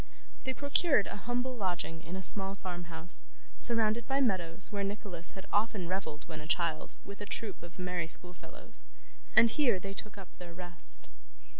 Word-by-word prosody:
They 260 0 -2
procured 285 - +3
a - - -6
humble 245 +4 -2
lodging 175 -6 -3
in 170 +2 -7
a 190 - -4
small 195 +1 +1
farmhouse, 175 -3 -7 0.3
surrounded 230 -1 +2
by 270 0 +1
meadows 185 -7 +2
where 200 -1 -2
Nicholas 195 -4 -4
had 190 - -8
often 205 -3 +1
revelled 170 -5 -4
when 155 -2 -7
a 150 - -9
child 165 -2 -1
with 200 +1 -9
a 205 - -5
troop 210 -2 -5
of 170 0 -12
merry 180 -2 -2
schoolfellows; 180 +2 -4 0.5
and 230 - +8
here 235 -7 +3
they 195 +2 -6
took 205 +1 -9
up 195 -2 -11
their 170 -1 -9
rest. 175 -1 +6
190 Hz, 170 wpm, -32 LUFS, 175-215 Hz, 0.5 s, and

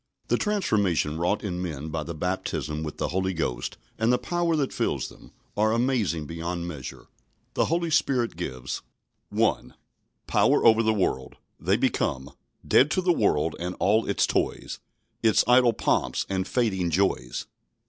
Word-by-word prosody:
The - - +3
transformation 100 - +1
wrought 90 +5 0
in 90 -3 -3
men 80 -4 -4
by 80 0 -2
the 85 +2 -6
baptism 75 -3 -2
with 75 -1 -5
the - - -1
Holy 95 +2 -1
Ghost, 70 -7 -3 0.2
and 110 +2 +3
the 125 - +4
power 175 +1 0
that 140 -4 -1
fills - - -1
them, - - -16 0.2
are 110 +1 +2
amazing 115 - 0
beyond 85 +2 -4
measure. 75 -7 -7 0.5
The - - +2
Holy 170 0 0
Spirit 130 - +1
gives 65 -7 -5 0.5
1. - - 0 0.5
Power - - +3
over 115 -1 +7
the 110 -1 +2
world. 90 -11 -1 0.2
They - - +2
become 65 +2 -1 0.4
"Dead 140 - +5
to 185 - +1
the 180 -1 +3
world 80 - +1
and 90 +1 -3
all 105 +4 +2
its - - +2
toys, - - -2 0.4
Its 110 -2 +4
idle 125 -1 +6
pomps - - 0
and 95 -1 -2
fading 95 -8 0
joys." 95 +4 0
95 Hz, 160 wpm, -26 LUFS, 80-120 Hz, 0.5 s, over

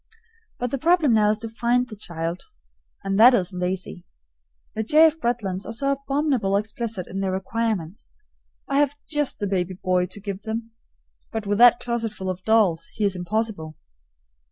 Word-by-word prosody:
But 245 -1 -3
the 275 - -2
problem 325 -4 +3
now 210 -1 +4
is 215 - +1
to 225 +1 -7
find 240 +2 0
the 220 - -9
child, 170 -3 -5 0.6
and 195 +1 -1
that 245 +3 +8
isn't 180 -3 -1
easy. 180 -1 -4 0.7
The 220 - -2
J. 305 +9 +5
F. 320 0 +2
Bretlands 210 -7 -2
are 225 - -6
so 275 +4 0
abominably 275 -7 0
explicit 215 -2 -4
in 195 - -6
their 195 -1 -1
requirements. 190 -2 -3 0.5
I 275 0 +1
have 290 -1 +2
just 295 -3 -1
the 205 - -3
baby 185 -2 -1
boy 180 -1 0
to 185 +3 -9
give 200 -1 -6
them; 225 +2 -5 0.6
but 220 -2 -4
with 205 +1 0
that 240 0 +7
closetful 225 -5 -3
of 185 0 -8
dolls, 190 -7 +2
he 210 - 0
is 200 -2 +1
impossible. 180 -4 -3
215 Hz, 175 wpm, -24 LUFS, 190-240 Hz, 0.7 s, that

